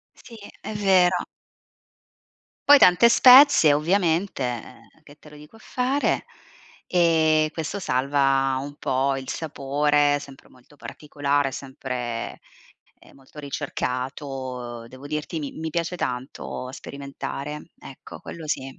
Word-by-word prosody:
Sì, 230 - -14 0.3
è 215 - -6
vero. 185 -3 +3 1.5
Poi 290 - +10
tante 180 +2 +6
spezie 255 - +7
ovviamente, 160 - 0 0.4
che 145 -1 -16
te 150 - -16
lo 150 - -15
dico 150 +7 -15
a - - -16
fare? 260 +5 -1 0.6
E 160 -3 +3
questo 165 +5 -4
salva 135 -1 +1
un 145 +1 -8
po' 135 +1 0
il 130 - -8
sapore, 145 -1 0
sempre 140 -1 -13
molto 125 +3 -22
particolare, 145 -2 -2
sempre, 125 -3 -6 0.6
ehm, - - -19
molto 135 +2 -18
ricercato. 130 -3 -5
Devo 130 +3 -12
dirti, 150 +2 -4
mi 145 -3 -5
mi 160 0 -5
piace 170 +2 -2
tanto 125 -1 -5
sperimentare. 140 +2 -7
Ecco, 135 - -12
quello 165 -2 -9
sì. 135 -3 -4
145 Hz, 120 wpm, -24 LUFS, 135-165 Hz, 1.5 s, Poi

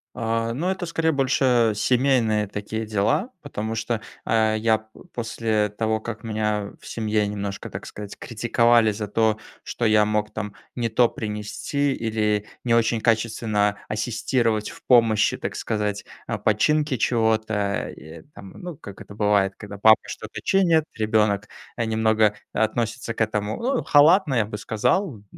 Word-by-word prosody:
А, 115 0 -1
ну, 170 +8 -1
это 190 -1 -2
скорее 165 -1 0
больше 130 -5 +2
семейные 120 -2 +2
такие 105 +2 -4
дела, 105 - 0
потому 110 +2 -4
что, 115 0 -2 0.3
э, 110 -1 +2
я 110 0 +3
п 110 0 -19 0.2
после 110 -2 -1
того, 110 +1 -1
как 110 -1 -6
меня 105 -2 -2
в - - -18
семье 110 -2 0
немножко, 100 -1 -5
так - - -7
сказать, 105 -1 -8
критиковали 115 -1 +3
за 105 0 -4
то, 110 +1 +1 0.2
что 120 - -3
я 105 -1 +5
мог, 105 0 -1
там, 105 -2 -5 0.2
не 120 -2 -1
то 115 +2 +3
принести 110 +7 -2
или 105 -2 0 0.2
не 120 -2 +2
очень 115 -1 +2
качественно 110 -2 +1
ассистировать 110 0 0
в - - -13
помощи, 115 -4 +4
так - - -5
сказать, 105 -1 -2 0.2
а, - - -2
починки 145 +6 +1
чего-то. 110 -1 +1
Э, 100 -5 -4
ну 145 - -9
как 100 -6 -11
это 100 - -11
бывает, 105 -2 +2
когда 105 -1 -9
папа 110 +1 +6
что-то - - -7
чинит, 170 -5 +3
ребенок, 110 -1 +1 0.3
э, 115 - -1
немного 110 -1 +2 0.2
относится 115 +1 -1
к - - -4
этому, 105 -1 -1
ну, 255 +2 0
халатно, 150 0 +5
я 110 - +2
бы 105 0 -6
сказал, 120 - 0
110 Hz, 150 wpm, -23 LUFS, 105-120 Hz, 0.3 s, папа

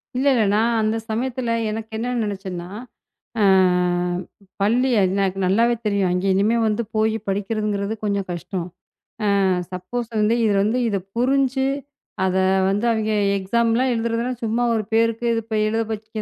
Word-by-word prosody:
இல்ல, 260 +2 0
இல்ல. 235 -4 +3
நான் 230 +2 +2
அந்தச் 220 +1 -1
சமயத்துல 245 +1 -2 0.2
எனக்கு 220 +1 -5
என்ன 245 +3 -2
நினைச்சன்னா, 190 -4 -5 0.7
அ - - +3 1.2
பள்ளி 240 +6 +2
எ - - +4
எனக்கு 195 -1 0
நல்லாவே 230 +6 +3
தெரியும். 200 -3 +1
அங்கே 180 +2 0
இனிமே 210 +4 +2
வந்து 215 +2 0
போய்ப் 220 0 0
படிக்கிறதுங்கிறது 205 +1 -1
கொஞ்சம் 200 -2 -1
கஷ்டம். 175 0 -4 0.8
அ - - +2 0.3
சப்போஸ் 200 +7 -4
வந்து 210 +2 +3
இதுல 205 -3 +2
வந்து 220 +5 +1
இதப் 195 -2 -3
புரிஞ்சு 265 +1 +2 0.6
அத 185 0 0 0.3
வந்து 205 +4 0
அவங்க 220 -1 0 0.3
எக்ஸாம் 230 +5 +1
எல்லாம் 255 +2 +2
எழுதுறதுனா 230 +1 -1
சும்மா 230 +2 0
ஒரு 220 -1 0
பேருக்கு 230 +1 +2 0.2
இப்ப 220 0 -5
எழுத 225 +1 0
வைக்க 215 0 -5
220 Hz, 150 wpm, -22 LUFS, 200-235 Hz, 1.2 s, எ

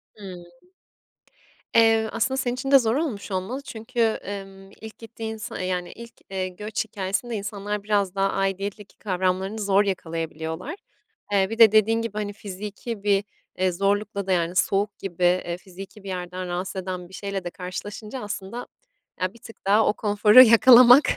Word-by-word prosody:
Hımm. 185 -4 -9 1.3
Eee, 225 -1 +5
aslında 235 +4 0
senin 245 -1 -1
için 270 +2 -4
de 275 - +9
zor 230 0 0
olmuş 245 -11 -3
olmalı 190 +9 -3
çünkü, 235 0 -6
emm, 195 -3 -3
ilk 220 +1 -12
gittiğin 225 -1 -7
sa 215 - -7
yani 180 -1 -3
ilk, 235 0 -11 0.2
eee, 190 -1 -2
göç 210 +4 -4
hikâyesinde 200 +5 -3
insanlar 205 +1 -4
biraz 200 -2 0
daha 195 0 +1
aidiyetteki 195 +1 -3
kavramlarını 190 +1 -1
zor 200 0 +3
yakalayabiliyorlar. 165 - -4 0.6
Eee, 195 -1 +2
bir 225 - -5
de 225 -3 +8
dediğin 220 +1 +3
gibi 230 -3 -4
hani 205 -1 -3
fiziki 205 +2 -7
bir, 200 -1 +2 0.3
eee, 185 0 +2
zorlukla 200 +1 -1
da - - 0
yani 175 0 0
soğuk 195 +3 +1
gibi, 180 -2 -5
eee, 175 -1 +2
fiziki 195 +3 -12
bir - - -10
yerden 180 0 -5
rahatsız 185 +2 -3
eden 180 -1 -6
bir - - -18
şeyle 200 -1 -4
de 175 - -4
karşılaşınca 205 +7 -7
aslında 205 +2 -6 0.5
ya 185 +3 -1
bir 235 - -17
tık 225 -3 -15
daha 210 +2 +5
o 210 - +3
konforu 210 +3 +6
yakalamak 245 +3 +8
200 Hz, 165 wpm, -24 LUFS, 185-220 Hz, 1.3 s, de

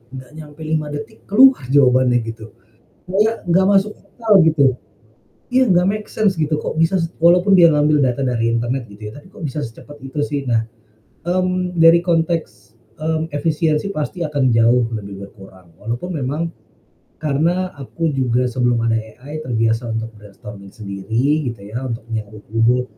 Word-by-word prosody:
nggak 130 +1 -10
nyampe 150 +1 -11
5 155 -1 -1
detik 145 0 -8
keluar 250 - +5
jawabannya 130 -3 +3
gitu, 115 -1 -9 0.5
kayak 210 +2 0
nggak 185 +2 +3
masuk 200 +1 +2
akal, 215 -6 +2
gitu. 145 -5 +3 0.7
Iya 255 -3 +3
nggak 180 0 +3
make 210 +1 -2
sense 205 -3 +1
gitu 155 -1 -1
kok - - -4
bisa 165 +4 +2
s 165 - 0 0.2
walaupun 180 +3 +5
dia 170 -2 +7
ngambil 150 -1 +3
data 125 +1 0
dari 115 -2 0
internet 120 +3 -1
gitu 105 +1 -9
ya, - - -7
tapi 145 +6 -14
kok - - -15
bisa 145 +2 -4
secepat 120 +5 -10
itu 135 +3 -6
sih. 145 -1 -3
Nah, 115 -3 0 0.6
mmm, 185 0 -1
dari 165 0 +6
konteks, 165 - -2 0.2
mmm, 160 +2 -2
efisiensi 155 +3 0
pasti 170 +1 -4
akan 140 -6 +1
jauh 115 +1 +4
lebih 100 -2 -7
berkurang, 95 -4 -17
walaupun 120 - -5
memang 145 +4 -2 0.8
karena 170 +6 0
aku 160 +4 -3
juga 125 -3 0
sebelum 120 -1 +1
ada 115 -1 +1
AI 130 +7 -9
terbiasa 115 -4 -1
untuk 115 0 -4
brainstorming 100 -1 -12
sendiri 110 +9 -1
gitu 115 -4 -6
ya, 125 +4 -4
untuk 115 -2 -5
nyari 105 -1 -6
ide, 115 +3 +2
145 Hz, 160 wpm, -19 LUFS, 115-170 Hz, 0.8 s, dia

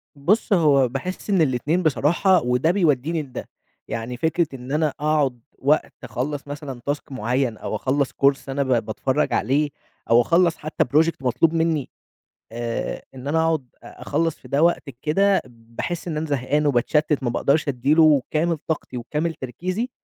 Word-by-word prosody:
بُصّ، 200 +9 +1
هو 145 -7 +4
باحس 180 - -5
إن 190 -4 +3
الاتنين 150 +6 +1
بصراحة 170 +5 +3
وده 125 +7 +2
بيوديني 160 -3 +1
لده. 130 -3 -8 0.4
يعني 115 +2 -4
فكرة 160 +3 +1
إن 130 +1 -8
أنا 155 +1 +2
أقعد 145 -5 +1 0.2
وقت 145 +3 +1
أخلّص 145 +3 -4
مثلًا 145 -4 -7
task 145 0 -3
معيّن 125 -1 -1
أو - - -4
أخلّص 135 +4 0
course 140 0 +1
أنا 140 +1 0
ب - - -6 0.2
باتفرّج 130 +7 -1
عليه 145 +6 +1 0.4
أو 120 +1 +6
أخلّص 170 +3 +3
حتى 155 +1 -1
project 155 +3 +1
مطلوب 150 +6 +2
مني، 160 -4 0 0.6
آآ، 115 0 -3
إن 130 +2 -8
أنا 160 +2 +1
أقعد 160 -5 0 0.2
أ - - -13
أخلّص 160 +2 0
في - - -16
ده 140 +3 +1
وقت 170 -4 +2
كده، 195 +6 +2
باحس 120 +9 -6
إن 155 -3 -2
أنا 155 - -2
زهقان 145 +1 0
وباتشتِّت 145 +2 +1
ما 120 - +1
باقدرش 145 +5 +1
أدّي 135 +2 +1
له 155 -4 +6
كامل 165 +2 +1
طاقتي 155 -5 -3
وكامل 150 +7 -2
تركيزي، 185 - -4
145 Hz, 165 wpm, -23 LUFS, 130-160 Hz, 0.6 s, أو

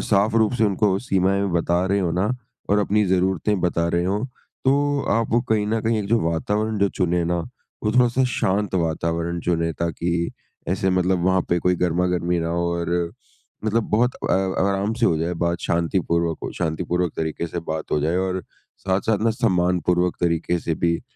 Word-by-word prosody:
साफ 105 +1 +2
रूप 110 -1 +3
से 115 - +2
उनको 105 +1 +2
वो 95 - +1
सीमाएँ 100 -3 +1
बता 85 +1 +1
रहे 100 +1 +1
हों 85 -3 0
ना 95 +6 +1 0.4
और 105 - +4
अपनी 105 +1 +2
जरूरतें 95 +2 +1
बता 85 -1 +1
रहे 85 +1 +1
हों, 100 +4 0 0.4
तो 145 +1 +2
आपको 115 +2 +2
कहीं 110 -4 0
न 110 +1 0
कहीं 115 0 +1
एक 100 - -3
जो 115 +1 +3
वातावरण 105 +6 -1
जो 100 - +3
चुनें 90 -3 0
ना 85 +1 0 0.5
वो 105 - +1
थोड़ा-सा 125 +1 +3
शांत 100 +1 0
वातावरण 85 0 -1
चुनें 85 -1 0
ताकि 85 0 -1 0.4
ऐसे 95 +1 +1
मतलब 90 -1 +1
वहाँ 95 0 +3
पे 85 - +2
कोई 90 +1 +2
गर्मा-गर्मी 90 0 0
ना 80 - -2
हो 85 +1 0
और 85 0 -2 0.7
मतलब 110 +1 +1
बहुत 120 +4 +2
अ, - - -2
व 95 0 0
आराम 100 +2 0
से 120 0 +2
हो 80 - +2
जाए 85 +2 -1
बात 85 0 0
शांतिपूर्वक 85 -1 0
हो - - -4
शांतिपूर्वक 90 0 -1
तरीके 80 +1 -2
से 85 +1 -4
बात 80 0 -4
हो 75 - +2
जाए 80 +4 0
और 95 -1 -1 0.4
साथ-साथ 100 +3 0
ना 115 - +4
सम्मानपूर्वक 90 -5 +1
तरीके 85 0 +1
से 85 0 -2
भी 85 +1 0
90 Hz, 185 wpm, -23 LUFS, 85-105 Hz, 0.7 s, और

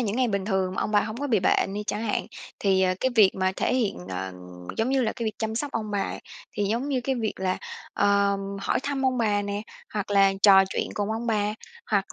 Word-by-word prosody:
những 220 -2 -1
ngày 255 -2 +2
bình 200 -2 -1
thường 190 -2 0
mà - - -1
ông - - -2
bà 205 -1 +4
hổng 215 +1 -4
có 285 +3 -2
bị 225 -7 +2
bệnh 195 +1 +2
đi 210 - -2
chẳng 210 +2 -2
hạn, 220 -2 -1 0.3
thì, 190 -2 +2
ờ, 185 -1 +2
cái 260 - +2
việc 210 -5 +7
mà 185 0 +1
thể - - +1
hiện 235 -6 0
ờ, 95 0 -4 0.4
giống 225 - +1
như 270 -1 +2
là 220 - 0
cái 235 - -5
việc 215 -2 -2
chăm 220 0 -2
sóc 285 +5 -3
ông 215 -2 -3
bà 200 -1 0
ấy, - - -4 0.3
thì 205 -4 -1
giống 230 +7 -1
như 265 -3 0
cái 265 +2 -1
việc 225 -4 -1
là, 185 0 -1 0.4
ờ, 200 0 +3 0.2
hỏi - - +1
thăm 275 -2 -1
ông 255 -1 +1
bà 210 -3 +2
nè, 205 0 -3 0.3
hoặc 205 -1 -2
là 195 -1 +5
trò 195 -2 +8
chuyện - - -1
cùng 205 0 -1
ông 225 +2 -3
bà, 210 -2 +1 0.4
hoặc - - +1
210 Hz, 255 wpm, -26 LUFS, 200-235 Hz, 0.4 s, trò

